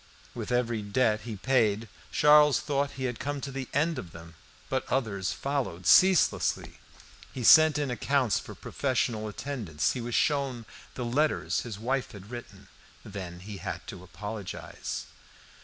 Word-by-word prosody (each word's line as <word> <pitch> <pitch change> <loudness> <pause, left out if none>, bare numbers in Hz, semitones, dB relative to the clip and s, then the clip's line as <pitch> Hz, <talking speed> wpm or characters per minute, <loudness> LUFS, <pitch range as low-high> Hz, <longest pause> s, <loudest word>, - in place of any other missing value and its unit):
With - - -5
every 120 -2 0
debt 110 +1 +1
he 115 -3 -5
paid 110 -1 +1 0.2
Charles 150 -1 +6
thought 140 -1 -1
he 130 - -6
had 125 -3 -2
come 145 0 -3
to 135 - -5
the 135 -1 -5
end 155 +3 +1
of 85 - -9
them. 80 0 -11 0.3
But - - -3
others 100 -7 0
followed 135 -11 -3
ceaselessly. 185 - +4 0.5
He 130 - -5
sent 155 +4 +8
in 145 -3 -1
accounts 125 0 +1
for - - -10
professional 120 -5 -1
attendance. 105 - -2
He 125 - -4
was 120 0 -3
shown 135 -5 0 0.3
the 125 - -3
letters 150 +6 +1
his 115 -5 -6
wife 130 +4 -2
had 100 +2 -11
written. 120 -1 -9 0.4
Then 90 -4 -7
he 100 +1 -8
had 90 -2 -6
to 95 -5 -9
apologise. 100 +2 -6
120 Hz, 155 wpm, -28 LUFS, 100-140 Hz, 0.5 s, sent